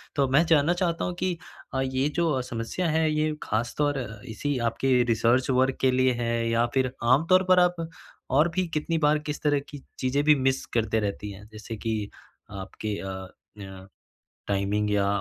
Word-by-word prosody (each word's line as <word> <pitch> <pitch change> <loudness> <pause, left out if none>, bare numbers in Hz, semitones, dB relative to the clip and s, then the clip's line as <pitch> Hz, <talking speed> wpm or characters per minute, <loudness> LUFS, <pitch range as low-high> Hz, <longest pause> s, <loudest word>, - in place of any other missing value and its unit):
तो 140 - +3
अब 130 - 0
मैं 160 +5 +5
जानना 160 +1 +4
चाहता 175 -2 -1
हूँ 180 - -2
कि 180 -2 -1 0.4
अ, 130 - 0
ये 130 +1 0
जो 160 -7 +1
समस्या 125 +8 -3
है, 160 0 +2
ये 155 0 0
ख़ास 115 +2 -2
तौर 145 -2 +1 0.3
इसी 135 +6 -2
आपके 135 +3 -1
रिसर्च 120 +3 +2
वर्क 130 +1 +2
के 130 - +4
लिए 130 0 +3
है 115 -1 0
या 115 +1 +2
फिर 130 -2 +1
आम 130 +7 +4
तौर 185 +1 +6
पर 180 - +7
आप 180 0 +3 0.5
और 150 +6 +4
भी 185 -1 +1
कितनी 160 +2 0
बार 150 0 +3
किस 150 - -4
तरह 145 -2 +2
की 145 - -8 0.2
चीज़ें 135 +3 +1
भी 150 0 +6
मिस 135 0 0
करते 110 -1 +1
रहती 105 0 -3
हैं? 100 +2 -12
जैसे 110 +1 -7
कि 110 -2 -3 0.4
आपके 100 +1 -5
अ, 95 -1 -6 0.3
य 95 -1 -10 0.6
टाइमिंग 100 +1 0
या 100 -1 +2
130 Hz, 190 wpm, -26 LUFS, 110-150 Hz, 0.6 s, पर